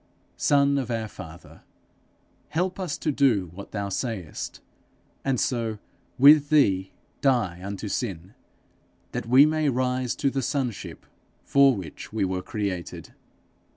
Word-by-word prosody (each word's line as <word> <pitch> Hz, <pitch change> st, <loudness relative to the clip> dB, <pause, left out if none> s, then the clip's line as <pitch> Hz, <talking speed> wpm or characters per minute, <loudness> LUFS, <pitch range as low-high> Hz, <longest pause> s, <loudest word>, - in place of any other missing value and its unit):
Son 140 Hz, -1 st, +3 dB
of 125 Hz, -3 st, -4 dB
our 115 Hz, -2 st, -2 dB
Father, 85 Hz, -5 st, -12 dB, 0.9 s
help 180 Hz, +4 st, -1 dB
us 180 Hz, -6 st, -3 dB
to 155 Hz, -, -1 dB
do 115 Hz, -, +2 dB
what 100 Hz, +2 st, -9 dB
thou 100 Hz, -1 st, -3 dB
sayest, 100 Hz, -, -4 dB, 0.6 s
and 135 Hz, -3 st, 0 dB
so 115 Hz, -4 st, -1 dB, 0.4 s
with 145 Hz, +2 st, +7 dB
thee 95 Hz, -11 st, +3 dB, 0.3 s
die 110 Hz, -10 st, +1 dB
unto 100 Hz, +2 st, -5 dB
sin, 95 Hz, -4 st, -4 dB, 0.8 s
that 115 Hz, -, -4 dB
we 130 Hz, +4 st, +7 dB
may 155 Hz, -1 st, +1 dB
rise 125 Hz, -1 st, 0 dB
to 140 Hz, -, 0 dB
the 135 Hz, -, -1 dB
sonship 130 Hz, -6 st, -3 dB, 0.4 s
for 140 Hz, -2 st, +5 dB
which 90 Hz, -7 st, -8 dB
we 110 Hz, -2 st, 0 dB
were 90 Hz, 0 st, -2 dB
created. 95 Hz, -3 st, -5 dB
120 Hz, 130 wpm, -25 LUFS, 100-140 Hz, 0.9 s, with